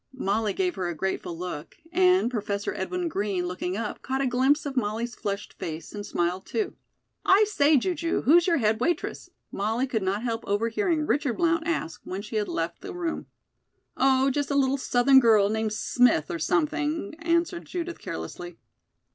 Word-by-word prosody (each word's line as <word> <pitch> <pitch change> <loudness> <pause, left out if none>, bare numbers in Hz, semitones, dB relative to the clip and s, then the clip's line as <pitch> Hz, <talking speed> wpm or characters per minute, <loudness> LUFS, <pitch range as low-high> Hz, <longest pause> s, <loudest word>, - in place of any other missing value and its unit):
Molly 210 -2 0
gave 365 -2 0
her 180 - -1
a 175 - -3
grateful 175 -1 -3
look, 175 -4 -6 0.2
and 365 -6 +4
Professor 205 -3 -2
Edwin 350 - -2
Green, 200 - -1
looking 180 +1 -3
up, 220 -1 -4
caught 265 +1 -2
a 275 - +1
glimpse 265 +4 +2
of 280 -2 -4
Molly's 235 0 -1
flushed 200 -4 -4
face, 160 -1 -6
and 205 -1 -5
smiled, 180 -1 -2
too. 420 -4 -2 0.5
"I 395 +3 +6
say, 305 -7 +4
Ju 360 +8 0
ju, 335 -1 -1
who's 340 +7 +5
your 335 -2 +3
head 220 -3 +1
waitress?" 335 +7 -2 0.2
Molly 225 +5 0
could 240 -5 -2
not 195 +4 -1
help 230 -2 -2
overhearing 265 - 0
Richard 285 -5 0
Blount 330 -1 +1
ask 240 - -2
when 190 +2 -5
she 215 +1 -4
had 210 - 0
left 165 +1 -3
the - - -7
room. 340 -2 -3 0.7
"Oh, 265 0 +3
just 285 +1 -1
a 280 - 0
little 270 0 +2
Southern 260 +1 +5
girl 220 -5 +5
named 220 0 -1
Smith, 240 -7 +2
or 170 - -3
something," 305 - 0
answered 335 +1 0
Judith 345 -1 -5
carelessly. 170 - -7
245 Hz, 180 wpm, -26 LUFS, 200-315 Hz, 0.7 s, I